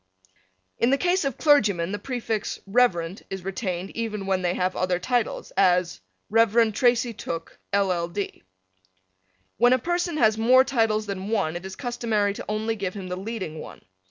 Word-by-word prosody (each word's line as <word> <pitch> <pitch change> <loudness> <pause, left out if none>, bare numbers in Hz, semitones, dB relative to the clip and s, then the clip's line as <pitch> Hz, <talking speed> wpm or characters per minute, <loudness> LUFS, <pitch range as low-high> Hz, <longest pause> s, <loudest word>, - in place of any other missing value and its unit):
In 235 - +3
the 275 - +3
case 360 +3 +1
of 275 -4 -2
clergymen 205 - +3
the 205 - -3
prefix 225 -3 -3
Rev. 195 -5 +1
is 190 -2 -6
retained 190 -2 -3
even 215 -3 -4
when 190 -1 0
they 180 -1 0
have 185 0 0
other 185 -1 0
titles; 240 +6 -1
as 180 - +2 0.3
Rev. 225 0 +4
Tracy 245 0 +2
Tooke, 165 -5 -6
LL. 185 -4 +1
D. 200 +3 -5 1.2
When 245 +2 +5
a - - +4
person 345 +4 -1
has 220 -5 +3
more 255 +3 +6
titles 225 -5 +1
than 200 0 -5
one 195 -8 0
it 175 +2 -5
is 190 - -8
customary 230 -5 -1
to - - -8
only 220 +1 -1
give 195 -3 -4
him 190 -2 -6
the 180 - -2
leading 190 -5 -5
one. - - -10
210 Hz, 170 wpm, -25 LUFS, 185-240 Hz, 1.2 s, more